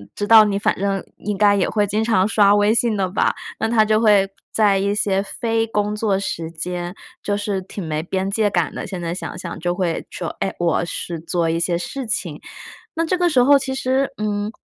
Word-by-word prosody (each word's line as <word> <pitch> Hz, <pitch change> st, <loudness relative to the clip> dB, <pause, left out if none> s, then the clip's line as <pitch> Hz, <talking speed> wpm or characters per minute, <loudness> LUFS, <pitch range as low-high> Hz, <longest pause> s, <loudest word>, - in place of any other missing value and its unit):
知 205 Hz, -, -2 dB
道， 220 Hz, 0 st, +8 dB
嗯， 210 Hz, -, 0 dB
你 200 Hz, -, -1 dB
反 -, -, +1 dB
正 195 Hz, -1 st, -1 dB
应 205 Hz, -1 st, -4 dB
该 205 Hz, 0 st, +4 dB
也 190 Hz, -, +1 dB
会 210 Hz, -1 st, +1 dB
经 210 Hz, +2 st, -1 dB
常 220 Hz, -4 st, +2 dB
刷 205 Hz, -2 st, +4 dB
微 205 Hz, +1 st, +3 dB
信 230 Hz, -2 st, +1 dB
的 195 Hz, -2 st, 0 dB
吧， 185 Hz, -, +1 dB, 0.3 s
那 220 Hz, -, 0 dB
他 225 Hz, -2 st, +4 dB
就 215 Hz, 0 st, +2 dB
会 205 Hz, -3 st, +4 dB, 0.2 s
在 205 Hz, -3 st, +3 dB
一 200 Hz, +1 st, 0 dB
些 195 Hz, -2 st, +1 dB
非 225 Hz, +2 st, -1 dB
工 210 Hz, -1 st, -1 dB
作 210 Hz, -3 st, 0 dB
时 165 Hz, -4 st, -4 dB
间， 175 Hz, +2 st, -5 dB, 0.3 s
就 205 Hz, -, -1 dB
是 205 Hz, -2 st, -2 dB
挺 190 Hz, 0 st, -7 dB
没 155 Hz, -1 st, -2 dB
边 190 Hz, +3 st, -2 dB
界 210 Hz, 0 st, +2 dB
感 175 Hz, -5 st, 0 dB
的， -, -, -5 dB
现 185 Hz, -2 st, -6 dB
在 170 Hz, 0 st, -3 dB
想 180 Hz, -, -6 dB
想 170 Hz, -, -7 dB
就 175 Hz, +1 st, -1 dB
会 175 Hz, -3 st, -2 dB
说： 170 Hz, -, -5 dB
“哎， 195 Hz, -, -1 dB
我 170 Hz, 0 st, +1 dB
是 170 Hz, 0 st, -5 dB
做 170 Hz, 0 st, -1 dB
一 165 Hz, +1 st, 0 dB
些 170 Hz, 0 st, 0 dB
事 255 Hz, +8 st, -5 dB
情。” 170 Hz, -8 st, -3 dB, 0.5 s
那 330 Hz, 0 st, -1 dB
这 365 Hz, +2 st, 0 dB
个 355 Hz, 0 st, +2 dB
时 260 Hz, -6 st, +4 dB
候 280 Hz, +3 st, +6 dB
其 265 Hz, -1 st, -3 dB
实， 265 Hz, +1 st, 0 dB
嗯， 210 Hz, 0 st, -2 dB
205 Hz, 245 characters per minute, -20 LUFS, 180-220 Hz, 0.5 s, 道